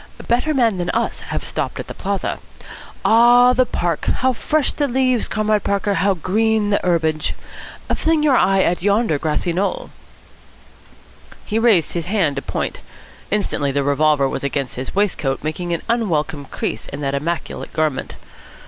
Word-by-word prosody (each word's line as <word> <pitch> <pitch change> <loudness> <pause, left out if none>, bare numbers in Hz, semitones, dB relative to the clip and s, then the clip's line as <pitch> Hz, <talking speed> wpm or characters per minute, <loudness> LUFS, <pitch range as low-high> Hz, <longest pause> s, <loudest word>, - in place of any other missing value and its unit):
Better 245 +6 +1
men 235 -8 +2
than 175 0 -2
us 230 - -1
have - - -5
stopped - - -3
at - - -4
the - - -8
Plaza. - - -3 0.7
Ah, 240 +2 +6
the 255 0 +2
Park! 170 -2 -2
How 260 0 +1
fresh 305 +4 0
the 290 - -1
leaves, 255 -1 +1
Comrade 215 -1 0
Parker, 200 0 0
how 195 +2 +2
green 210 +4 +1
the 205 - +3
herbage! 160 -3 0 0.6
Fling 320 -1 +1
your 290 -4 +4
eye 195 -4 +3
at 175 - 0
yonder 200 -5 +2
grassy 160 +3 -1
knoll." 200 - -2 1.5
He 220 0 -1
raised 220 -8 +3
his 170 -1 -3
hand 185 -8 +1
to - - -1
point. - - -3 0.5
Instantly 195 -9 0
the 140 +1 0
revolver 145 0 +2
was - - -4
against 140 -2 -2
his 130 +7 -6
waistcoat, 170 -10 0
making 175 +3 -3
an 170 - -2
unwelcome 165 -11 -1
crease - - -4
in 140 +1 -7
that 140 -1 -1
immaculate 160 +5 -3
garment. 155 -4 -1
190 Hz, 160 wpm, -20 LUFS, 155-230 Hz, 1.5 s, Ah